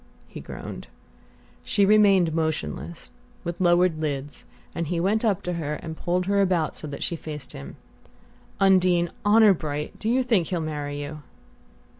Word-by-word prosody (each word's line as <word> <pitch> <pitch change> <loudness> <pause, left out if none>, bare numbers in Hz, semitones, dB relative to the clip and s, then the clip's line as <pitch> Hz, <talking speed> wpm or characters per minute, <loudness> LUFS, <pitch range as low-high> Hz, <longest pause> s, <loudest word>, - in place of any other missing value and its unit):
he - - -9
groaned. - - -8 0.8
She 200 - +2
remained 195 -5 +5
motionless, 160 +1 -3 0.3
with 170 +1 -5
lowered 175 -2 +3
lids, 145 -2 -4 0.3
and 170 -1 -3
he 170 +1 -1
went 205 +6 +1
up 210 -5 +1
to 180 - -2
her 150 -3 -3
and 160 +1 -7
pulled 180 +2 -1
her 200 +1 +2
about 180 -5 +1
so 155 - -7
that 140 -1 -5
she 170 - -1
faced 150 -4 -8
him. 70 0 -9 0.8
"Undine, 180 -3 +4
honour 210 0 +6
bright 150 -3 -5
do 220 - -2
you 255 +2 +2
think 215 -10 +2
he'll 180 - -1
marry 145 -2 -4
you?" 150 +1 -7
170 Hz, 160 wpm, -25 LUFS, 155-195 Hz, 0.8 s, honour